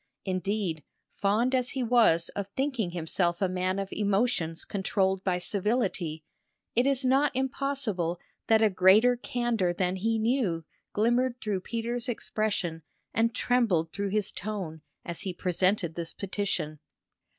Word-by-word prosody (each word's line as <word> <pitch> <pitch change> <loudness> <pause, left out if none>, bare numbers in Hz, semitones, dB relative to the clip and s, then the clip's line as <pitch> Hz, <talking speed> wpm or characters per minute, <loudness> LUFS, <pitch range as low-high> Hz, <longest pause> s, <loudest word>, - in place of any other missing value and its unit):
Indeed, 185 -3 -1 0.3
fond 215 +6 +1
as 250 -1 +2
he 260 - +1
was 220 -9 +4
of 200 -1 -4
thinking 255 -2 -1
himself 170 0 -1
a 195 - +2
man 185 +1 -1
of 195 -1 -3
emotions 200 -5 0
controlled 190 -1 0
by 185 -2 +1
civility, 185 -5 -1 0.5
it 245 +3 +4
is 270 -1 +3
not 270 +2 +3
impossible 260 - -1 0.3
that 220 0 +5
a 215 - +4
greater 195 +7 +6
candour 240 -7 0
than 180 +1 0
he 225 +4 +1
knew 220 - 0 0.3
glimmered 240 +3 +1
through 200 -3 -2
Peter's 235 +3 -3
expression 205 -8 -2 0.3
and 230 +1 +1
trembled 205 -10 +2
through 200 0 -2
his 210 0 +1
tone 190 -7 -5 0.2
as 170 -2 -2
he 185 -3 -4
presented 180 -1 +1
this 165 0 -5
petition. 185 -6 -3
200 Hz, 140 wpm, -28 LUFS, 180-235 Hz, 0.5 s, greater